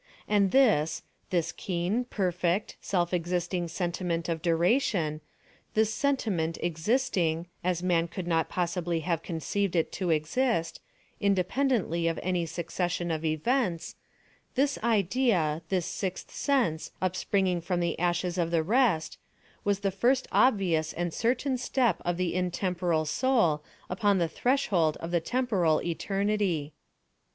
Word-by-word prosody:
And 205 -2 +3
this—this 175 - +1
keen, 185 +7 -2
perfect, 180 -3 -1
self 175 -2 0
existing 175 0 -1
sentiment 170 -1 -2
of 165 -1 -2
duration—this 175 - 0
sentiment 215 - 0
existing 170 -2 0 0.2
(as 180 -1 0
man 170 -2 +2
could 170 +2 -6
not 165 -2 +1
possibly 175 -1 -1
have 165 0 -1
conceived 180 +3 -2
it 165 - +1
to 185 -3 -2
exist) 165 - 0 0.4
independently 200 - +1
of 165 - -1
any 180 -2 0
succession 175 +1 -2
of 160 0 -2
events—this 235 - -2
idea—this 190 -7 +1
sixth 190 -2 -4
sense, 240 - 0
upspringing 185 0 0
from 175 +1 -1
the 170 -1 -1
ashes 175 +1 0
of 170 -1 +1
the 165 -1 +1
rest, 205 -5 +1 0.4
was 200 -1 0
the 195 -1 0
first 245 +7 +2
obvious 175 -10 +2
and 175 -1 -2
certain 255 +2 0
step 250 -1 +1
of 175 0 -1
the 180 -1 -1
intemporal 180 -2 0
soul 170 - +2 0.2
upon 200 +1 +2
the 170 -2 +2
threshold 180 - +1
of 165 - -6
the 170 -1 +2
temporal 195 -8 +1
Eternity. 195 -3 -1
180 Hz, 120 wpm, -28 LUFS, 165-205 Hz, 0.4 s, And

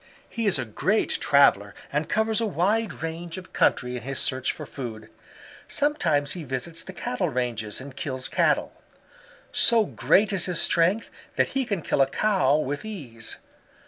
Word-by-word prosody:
"He 230 -2 -3
is 195 - +4
a 130 - -2
great 165 - 0
traveler 120 -8 +4 0.2
and 150 +2 -1
covers 220 +1 +1
a 225 - +1
wide 200 0 0
range 165 +2 -5
of 185 0 -11
country 125 0 +1
in 125 - -5
his 135 +3 -4
search 130 0 +1
for - - -8
food. 115 -5 -8 0.6
Sometimes 155 - +1
he 175 - -3
visits 140 +5 -3
the - - -8
Cattle 125 -8 -2
ranges 115 -4 -2
and 130 0 -10
kills 130 -3 -4
Cattle. - - +1 0.8
So 230 -2 +4
great 205 +1 +2
is 190 -2 +1
his 180 -2 +1
strength 180 +7 +2 0.2
that - - +2
he 270 -1 -1
can 195 -6 -2
kill - - +1
a 135 - +5
Cow 185 -7 +2
with 145 +1 -3
ease. 135 - -5
155 Hz, 170 wpm, -25 LUFS, 130-200 Hz, 0.8 s, a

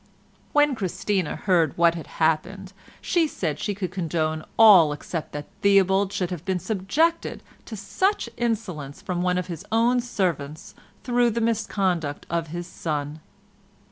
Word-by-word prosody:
When 295 -1 +4
Christina 195 -4 -2
heard 170 -7 +1
what 170 0 +5
had 165 -2 -7
happened 180 +5 0 0.3
she 340 -3 +2
said 160 - -3
she 205 - -2
could 190 -2 -4
condone 160 -3 -2
all 190 -9 +8
except 155 +2 -5
that 145 0 -5 0.2
Theobald 195 -1 +4
should 185 -2 -2
have 175 -3 -5
been 190 0 -1
subjected 220 - 0 0.2
to 225 - -7
such 375 - 0
insolence 200 - -3
from 180 -1 -3
one 180 0 +1
of 180 - -1
his 170 -4 -7
own 235 +3 +3
servants 170 - -3 0.3
through 245 -1 +2
the 230 +1 -2
misconduct 195 -9 -1
of 170 -1 -1
his 175 +2 -5
son. 150 -3 -4
185 Hz, 145 wpm, -24 LUFS, 165-220 Hz, 0.3 s, all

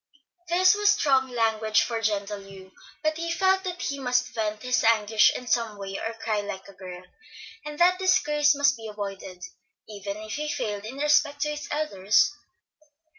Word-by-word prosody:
This 365 +2 +5
was 415 0 +2
strong 270 -10 +3
language 220 -2 +1
for 230 -1 -3
gentle 205 -1 -1
Hugh, 195 -1 -13 0.3
but 310 0 0
he 335 0 -3
felt 380 +2 +2
that 360 -1 -4
he 280 0 -3
must 250 -1 0
vent 215 -1 -3
his 250 0 +1
anguish 220 -1 +4
in 250 - -6
some 230 -3 0
way 195 -1 -6
or 225 0 -4
cry 220 -2 -2
like 195 -2 -7
a 200 - -13
girl; 185 -1 -10 0.6
and 300 0 -7
that 360 +2 +4
disgrace 300 -5 +3
must 280 0 +3
be 225 -1 -8
avoided, 195 -3 -7 0.4
even 200 -1 -6
if 215 0 -7
he 300 0 -3
failed 210 -7 -3
in 250 +5 -7
respect 290 0 +2
to 300 - +1
his 300 0 -5
elders. 215 -8 +2
230 Hz, 175 wpm, -26 LUFS, 205-295 Hz, 0.6 s, This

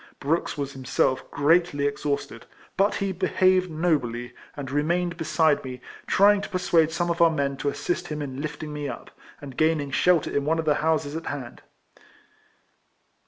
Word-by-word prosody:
Brooks 150 +2 -1
was 140 -1 -3
himself 130 0 0
greatly 145 0 +2
exhausted, 145 0 -3 0.3
but 195 +2 +2
he 195 -1 -1
behaved 185 0 +2
nobly, 130 -8 -1 0.2
and 140 -2 -5
remained 170 +4 0
beside 160 -2 +2
me, 130 -1 -7 0.3
trjang 200 +1 +5
to - - -6
persuade 170 -3 +2
some 175 +1 -1
of 170 - -2
our 170 - +7
men 140 -3 -1
to 145 - -1
assist 145 +5 -3
him 150 -1 -4
in 135 -2 -5
lifting 155 0 -5
me 145 -1 -4
up, - - -8 0.3
and 135 -3 -9
gaining 155 -2 +1
shelter 175 +3 +2
in 140 - +1
one 160 +3 +1
of 160 - -2
the 150 - +4
houses 155 -2 0
at 165 - -5
hand. 135 -4 -6
155 Hz, 165 wpm, -25 LUFS, 140-170 Hz, 0.3 s, our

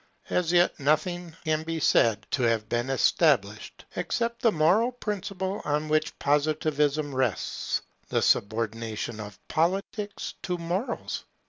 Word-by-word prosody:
As 175 -2 +1
yet 175 0 +3
nothing 160 +4 0
can 155 0 +1
be 165 0 -3
said 110 -7 +3
to 130 - 0
have 115 -2 +1
been 120 +3 -1
established, 130 - +1
except 235 +7 -1
the 230 - +4
moral 190 +9 +3
principle 200 -4 -3
on 150 +1 0
which 155 0 +1
Positivism 150 0 +1
rests, 130 -5 -1 0.3
the - - +1
subordination 110 +1 0
of 105 -1 -8
Politics 195 +5 -1
to 180 -1 -2
Morals. 175 +8 -3
155 Hz, 125 wpm, -27 LUFS, 120-180 Hz, 0.3 s, the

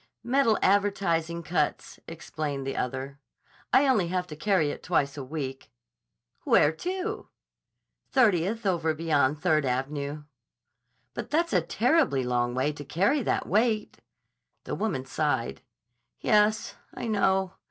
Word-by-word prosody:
"Metal 245 -3 +3
advertising 175 -4 +1
cuts," 150 -1 -2
explained 150 -4 -5
the 135 - -3
other. 130 +2 -4 0.5
"I 280 +1 +5
only 215 -10 +3
have 180 +1 -1
to 150 - -7
carry 165 -3 +1
it - - -8
twice 140 -5 0
a 140 - -5
week." 135 -1 -6 0.7
"Where 150 - +4
to?" 375 - -4 0.8
"Thirtieth 215 -3 +2
over 165 -4 +1
beyond 150 -2 +1
Third 155 -4 +3
Av'nyeh." 140 +3 -3 0.9
"But - - -6
that's 335 +3 +1
a - - +4
terribly 245 - +2
long 120 0 0
way 130 +4 +1
to 145 - -8
carry 190 - +1
that - - -1
weight." 215 +1 0 0.6
The - - -5
woman 185 -12 -2
sighed. 130 -4 -1 0.6
"Yes, 215 +1 +2 0.2
I - - -5
know. 190 -3 +1
165 Hz, 130 wpm, -27 LUFS, 145-210 Hz, 0.9 s, I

